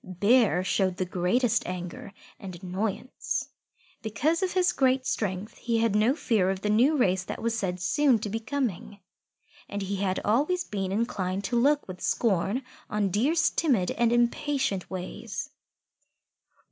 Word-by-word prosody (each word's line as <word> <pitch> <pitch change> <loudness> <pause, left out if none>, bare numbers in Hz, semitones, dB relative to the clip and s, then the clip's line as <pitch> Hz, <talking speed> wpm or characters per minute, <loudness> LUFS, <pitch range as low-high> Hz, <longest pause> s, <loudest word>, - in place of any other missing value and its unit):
Bear 200 +1 +3
showed 185 -1 0
the 185 - -1
greatest 210 +7 +1
anger 180 +1 -6 0.3
and 185 -4 -9
annoyance. 200 +7 -3 0.5
Because 295 - 0
of 375 -1 0
his 360 -1 +3
great 260 -3 +2
strength, 200 -2 -3
he 235 -1 0
had 225 -2 +2
no 220 +6 +3
fear 215 - +1
of 190 0 -2
the 210 - 0
new 260 +8 +4
race 190 -7 +2
that - - -6
was 230 0 -1
said 185 -5 -2
soon 260 - +3
to 215 - -5
be 220 +2 -2
coming, 225 -5 -3 0.7
and 205 0 -3
he 195 +1 -3
had 190 -1 0
always 295 - +2
been 195 - -3
inclined 195 -3 -1
to 240 +5 -2
look 285 +5 +3
with 185 -1 -8
scorn 215 +3 0 0.3
on 210 -2 0
Deer's 285 - +2
timid 240 - +1
and 235 -1 +1
impatient 240 -3 0
ways. 210 +10 -6
215 Hz, 155 wpm, -27 LUFS, 190-255 Hz, 0.7 s, new